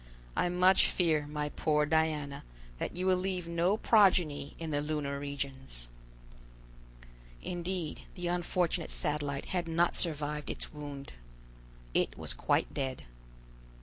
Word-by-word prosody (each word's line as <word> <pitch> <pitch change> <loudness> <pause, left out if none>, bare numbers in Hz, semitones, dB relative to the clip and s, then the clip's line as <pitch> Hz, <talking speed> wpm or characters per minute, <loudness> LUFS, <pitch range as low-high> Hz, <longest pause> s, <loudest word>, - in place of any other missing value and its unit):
I 175 - +2
much 180 +2 +5
fear, 155 -5 +1
my 150 0 -2
poor 150 0 +2
Diana, 150 -2 0 0.4
that - - -3
you 185 - -1
will 185 -1 +4
leave 180 -2 -2
no 170 +4 +2
progeny 180 -11 +4
in 165 -1 -4
the 145 -1 +1
lunar 145 -2 -2
regions!" 135 - -5 1.5
Indeed 175 -2 -3
the 180 - -5
unfortunate 175 -1 0
Satellite 145 -2 -2
had 175 -2 0
not 170 +1 +2
survived 150 -3 0
its - - -5
wound. 145 -2 -7 0.8
It - - +1
was - - -2
quite - - +1
dead. 130 - -3
155 Hz, 125 wpm, -32 LUFS, 145-175 Hz, 1.5 s, much